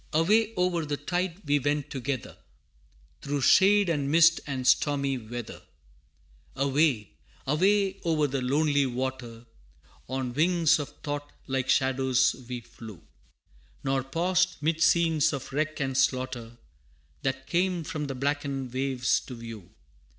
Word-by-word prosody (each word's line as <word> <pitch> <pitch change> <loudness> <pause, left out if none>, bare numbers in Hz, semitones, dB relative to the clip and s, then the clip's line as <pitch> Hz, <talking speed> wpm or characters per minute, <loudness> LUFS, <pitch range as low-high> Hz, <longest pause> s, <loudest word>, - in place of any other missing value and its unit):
Away 210 +8 +3
o'er 180 -2 +1
the 145 -1 -3
tide 180 +5 -3
we 145 0 +2
went 145 +1 -1
together, 130 -1 -4 0.9
Through 140 0 -2
shade 200 +6 +5
and 145 -5 0
mist 170 +2 +5
and 130 -3 -3
stormy 140 -1 +2
weather 120 +1 -8 0.9
Away, 140 -5 +1 0.3
away, 190 +7 +2
o'er 160 -3 +1
the 135 -1 -2
lonely 145 +1 +2
water, 125 -2 -5 0.6
On 130 -2 -3
wings 165 +2 +3
of 145 -1 -4
thought 145 0 -4
like 130 -1 -2
shadows 130 -1 +2
we 125 -1 -4
flew, 110 -5 -12 0.8
Nor 135 -1 0
paused 180 +6 0
'mid 160 +2 -1
scenes 160 -3 +3
of 135 -1 -6
wreck 155 +2 -1
and 135 -2 -2
slaughter, 130 -3 -1 0.6
That 135 0 -2
came 175 +1 0
from 150 -1 -4
the 135 - -4
blackened 140 -1 -2
waves 130 -1 +1
to 125 - -7
view. 115 -5 -9
140 Hz, 130 wpm, -27 LUFS, 130-160 Hz, 0.9 s, shade